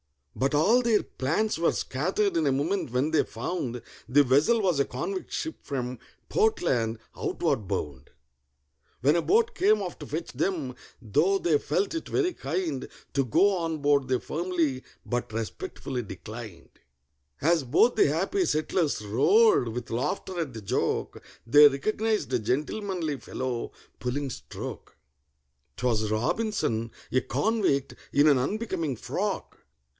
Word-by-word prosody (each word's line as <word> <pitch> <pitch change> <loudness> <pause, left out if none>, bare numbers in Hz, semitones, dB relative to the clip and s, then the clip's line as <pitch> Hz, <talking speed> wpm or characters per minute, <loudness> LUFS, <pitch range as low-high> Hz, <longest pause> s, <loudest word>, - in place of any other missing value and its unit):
But 135 +6 +1
all 215 +12 +5
their 230 -3 +2
plans 160 +9 -1
were 170 - +3
scattered 185 +9 0
in 160 -3 +2
a - - +3
moment 150 +6 0
when 130 +6 0
they 160 - +4
found 120 -1 -4 0.3
The 145 +3 +6
vessel 145 - +4
was 180 -8 +1
a 140 - +3
convict 385 -1 -4
ship 320 -1 -3
from 125 -3 -4 0.3
Portland, 120 - +1 0.2
outward 105 -4 -1
bound; 70 -5 -4 0.9
When 145 +5 +4
a 170 - +3
boat 450 - +3
came 420 +3 +3
off - - -5
to - - -8
fetch - - -4
them, 155 -10 -2 0.3
though 150 - +2
they 165 -6 +2
felt 185 - -1
it 330 - -4
very 365 -2 +1
kind, 155 - -3 0.3
To 140 - +2
go 195 - +3
on 165 -2 -2
board 140 -2 +2
they 130 - +2
firmly 165 -6 -1 0.2
but 120 -2 -2
respectfully 115 +2 -4
declined. 105 -3 -9 0.7
As 165 0 +3
both 155 - +3
the - - +5
happy 190 - +1
settlers 155 - 0
roared 395 - +4
with 120 +1 -5
laughter 150 +9 -2
at 150 -6 -3
the 110 - -7
joke, 100 - -1 0.2
They 145 +5 +8
recognized 215 +5 -1
a 125 - +3
gentlemanly 155 - -2
fellow 125 -2 -4 0.3
pulling 135 +2 -2
stroke: - - -8 0.8
'Twas 110 -3 0
ROBINSON—a 115 - -1
convict, 200 - 0 0.2
in 145 +2 +5
an 140 -4 +5
unbecoming 165 - -2
frock! - - -3
145 Hz, 140 wpm, -27 LUFS, 125-195 Hz, 0.9 s, They